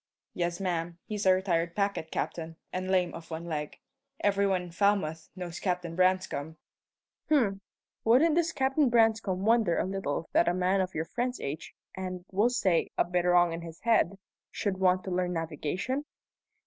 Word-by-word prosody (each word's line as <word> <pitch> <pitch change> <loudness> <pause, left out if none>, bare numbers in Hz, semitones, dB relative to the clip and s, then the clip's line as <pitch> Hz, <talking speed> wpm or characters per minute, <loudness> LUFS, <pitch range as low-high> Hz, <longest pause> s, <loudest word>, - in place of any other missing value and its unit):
"Yes, 175 0 -2
ma'am. 170 -3 -2
He's 210 -2 -2
a 185 - +8
retired 170 -3 0
packet 200 -5 -1
captain, 165 0 -3 0.2
and 185 +1 -3
lame 180 -2 +2
of 165 -1 -9
one 165 +1 -5
leg. 150 -3 -4 0.4
Every 200 0 +2
one 185 -2 +1
in 175 - -10
Falmouth 170 -4 +1
knows 175 -2 -6
Captain 180 -3 -2
Branscome." 185 -4 +1 0.7
"H'm! 220 -10 +2 0.4
Wouldn't 265 +8 +5
this 340 +1 +2
Captain 270 0 +2
Branscome 225 -5 +2
wonder 220 -6 +3
a - - +1
little 185 -5 -3
that - - +4
a 175 - +2
man 185 +1 +2
of 185 0 -3
your 160 +1 -1
friend's 245 +6 -2
age, 140 +3 -5 0.2
and 185 -1 -5
(we'll 205 +5 +3
say) 195 -9 +1
a - - +3
bit 180 0 0
wrong 175 -1 +4
in 165 - -5
his 165 -1 -10
head, 220 -5 +2 0.3
should 195 -3 -2
want 185 -1 +3
to 190 - -5
learn 180 0 0
navigation?" 165 - -2
185 Hz, 175 wpm, -29 LUFS, 170-205 Hz, 0.7 s, a